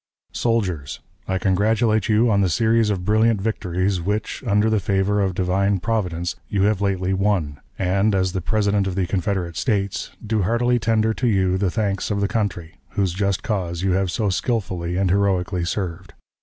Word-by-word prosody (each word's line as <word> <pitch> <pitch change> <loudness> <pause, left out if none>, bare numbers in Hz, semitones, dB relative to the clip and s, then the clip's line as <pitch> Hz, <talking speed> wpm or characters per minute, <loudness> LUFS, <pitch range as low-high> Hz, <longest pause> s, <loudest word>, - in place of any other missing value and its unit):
_ - - -18
"SOLDIERS: 90 -11 -1 0.3
I 95 - 0
congratulate 105 +3 +1
you 110 +2 +3
on 100 -1 +3
the 95 - +2
series 110 +5 +2
of 95 -3 -2
brilliant 110 +1 +3
victories 95 -3 -1
which, 105 +8 -3
under 105 +1 +3
the 110 -1 +2
favor 100 0 +1
of 95 -2 0
Divine 95 +2 +1
Providence, 90 -5 -2
you 100 -1 0
have 105 -1 +2
lately 95 -1 0
won, 95 -8 0 0.2
and, 100 +2 +1
as 95 -1 +1
the 95 0 -3
President 100 0 +1
of 95 - -3
the 95 -1 0
Confederate 90 -2 -2
States, 100 -5 -1 0.2
do 110 -1 0
heartily 120 +5 +1
tender 110 0 +1
to 125 - -1
you 95 -4 +2
the 95 0 +1
thanks 100 -1 -1
of 100 -1 -1
the 100 - +1
country, 95 -6 -3 0.2
whose 95 -4 +1
just 100 +1 -1
cause 90 -5 -2
you 95 - +2
have 95 0 +1
so 100 +3 0
skillfully 90 -5 -2
and 95 -2 +1
heroically 95 -2 +1
served. 90 -1 -4
100 Hz, 185 wpm, -22 LUFS, 90-105 Hz, 0.3 s, you